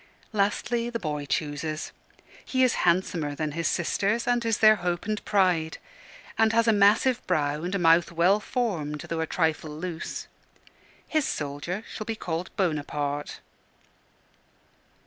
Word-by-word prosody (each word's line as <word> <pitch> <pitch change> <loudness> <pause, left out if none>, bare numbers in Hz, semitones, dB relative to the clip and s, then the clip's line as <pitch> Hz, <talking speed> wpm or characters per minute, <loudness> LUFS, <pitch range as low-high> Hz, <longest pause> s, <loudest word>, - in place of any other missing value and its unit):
Lastly 230 +3 0
the 235 - -2
boy 150 -7 -4
chooses. 155 +2 -2 0.5
He 260 -1 +1
is 255 - +4 0.2
handsomer 170 -4 0
than 155 0 -2
his 165 +2 -1
sisters, 200 +6 0
and 245 -1 +1
is 225 -2 +1
their 215 -1 +6
hope 175 -1 -2
and 215 -1 -2
pride; 180 -6 +2 0.6
and 225 0 +4
has 230 0 +3
a 225 - +5
massive 210 +5 +4
brow 150 -4 0
and 180 +3 -2
a - - +2
mouth 170 -1 +4
well 175 +5 +3
formed 175 - -2
though 165 -1 -3
a 160 - -1
trifle 160 -2 0
loose. 160 +2 -5 0.8
His 310 -3 +1
soldier 145 +8 -4
shall 215 - -6
be 225 - -3
called 170 -3 -4
Bonaparte. 145 -5 -2
175 Hz, 145 wpm, -26 LUFS, 155-215 Hz, 0.8 s, their